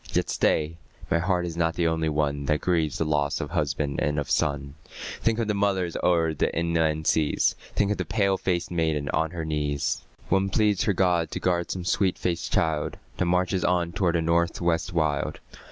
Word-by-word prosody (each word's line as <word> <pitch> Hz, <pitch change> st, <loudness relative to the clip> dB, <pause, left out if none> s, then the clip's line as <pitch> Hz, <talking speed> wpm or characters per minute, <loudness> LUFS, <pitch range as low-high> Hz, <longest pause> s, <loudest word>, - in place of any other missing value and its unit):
Yet -, -, 0 dB
stay, 80 Hz, +1 st, +1 dB, 0.3 s
my 85 Hz, -, +3 dB
heart 90 Hz, 0 st, 0 dB
is 85 Hz, -2 st, -5 dB
not 85 Hz, 0 st, 0 dB
the 85 Hz, -, 0 dB
only 80 Hz, -1 st, +1 dB
one 70 Hz, -2 st, -1 dB
That 75 Hz, +1 st, +1 dB
grieves 80 Hz, -5 st, 0 dB
the 80 Hz, -, 0 dB
loss 75 Hz, -2 st, 0 dB
of -, -, -5 dB
husband 70 Hz, 0 st, -1 dB
and 75 Hz, 0 st, 0 dB
of 75 Hz, -, -2 dB
son; 70 Hz, -1 st, 0 dB, 0.5 s
Think 115 Hz, -1 st, +1 dB
of 115 Hz, -2 st, -1 dB
the 105 Hz, -, +1 dB
mothers 95 Hz, -4 st, 0 dB
o'er 85 Hz, -3 st, +2 dB
the 75 Hz, -, 0 dB
inland 80 Hz, -2 st, +1 dB
seas; 75 Hz, -1 st, +2 dB, 0.2 s
Think 100 Hz, 0 st, +2 dB
of 105 Hz, -, 0 dB
the -, -, -1 dB
pale 100 Hz, -3 st, +1 dB
faced 90 Hz, -2 st, -1 dB
maiden 80 Hz, -4 st, 0 dB
on 80 Hz, 0 st, +1 dB
her 85 Hz, -2 st, -5 dB
knees; 75 Hz, -2 st, -1 dB, 0.3 s
One 95 Hz, +1 st, +2 dB
pleads 105 Hz, -1 st, +2 dB
her 100 Hz, -, +2 dB
God 90 Hz, -4 st, +2 dB
to -, -, -4 dB
guard 85 Hz, -1 st, 0 dB
some 90 Hz, -2 st, -4 dB
sweet 95 Hz, 0 st, +1 dB
faced 85 Hz, -2 st, -2 dB
child 80 Hz, -2 st, 0 dB, 0.2 s
That 90 Hz, -, +1 dB
marches 90 Hz, +1 st, +1 dB
on 90 Hz, -1 st, +1 dB
toward 85 Hz, -1 st, +1 dB
the 85 Hz, -, +1 dB
North 85 Hz, +1 st, +1 dB
West 85 Hz, -1 st, 0 dB
wild. 80 Hz, -4 st, 0 dB
85 Hz, 200 wpm, -26 LUFS, 75-90 Hz, 0.5 s, my